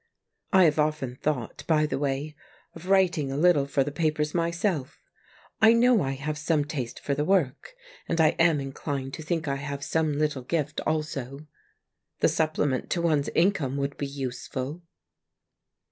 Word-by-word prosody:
I 190 -1 +6
have 155 -2 +3
often 150 -5 0
thought, 130 -5 -3
by 155 -2 +3
the 150 - -2
way, 145 +2 -2 0.4
of 170 +3 -10
writing 175 -8 +3
a 135 - -3
little 155 -4 +4
for 140 -1 +1
the 145 - -4
papers 150 -1 0
myself 170 - -1 0.6
I 220 +1 +8
know 235 -2 +4
I 135 -2 -1
have 150 +3 -4
some 155 -2 +1
taste 135 -6 -5
for 140 - -2
the 145 +2 0
work, 170 - 0 0.3
and 165 - 0
I 160 -1 +6
am 165 -3 +4
inclined 135 0 -4
to - - -6
think 160 0 -2
I 140 0 0
have 140 0 -5
some 155 -3 0
little 150 -3 0
gift 150 +2 -2
also. 145 -2 -3 0.7
The - - +4
supple 155 -1 0
ment 130 -3 -1
to 175 - 0
one's 150 -4 +2
income 165 -7 +2
would 140 0 -2
be 140 - -3
useful. 135 +2 -5
150 Hz, 170 wpm, -27 LUFS, 140-165 Hz, 0.7 s, I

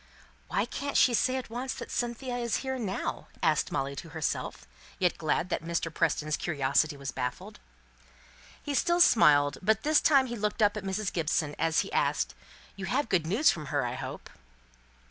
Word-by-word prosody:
"Why - - 0
can't 285 0 -3
she 250 - +5
say 255 +3 +2
at 255 -3 -6
once 250 +3 -3
that - - -8
Cynthia 245 +1 -2
is 235 -2 -1
here 265 -1 -2
now?" 200 -5 -3 0.2
asked 155 -2 +2
Molly 135 +1 -2
of 140 - -6
herself, 150 - -3 0.3
yet 180 -2 +1
glad 160 +2 0
that - - -1
Mr. 165 -1 -2
Preston's 155 -2 0
curiosity 145 -1 +1
was 140 -2 -5
baffled. 125 0 -5 1.0
He 290 - -3
still 345 +5 +2
smiled; 145 - +5
but 215 +2 +1
this 305 0 +4
time 275 -4 +5
he 240 -2 -5
looked 210 0 -1
up 205 0 +3
at 210 - -5
Mrs. 195 +1 -2
Gibson, 155 -2 0
as 165 0 +2
he - - -7
asked, - - +1 0.4
"You 195 - -5
have 250 +6 -1
good 170 -4 +1
news 220 - +4
from 155 -3 -6
her, - - 0
I - - -3
hope?" - - -7
195 Hz, 185 wpm, -29 LUFS, 155-245 Hz, 1.0 s, she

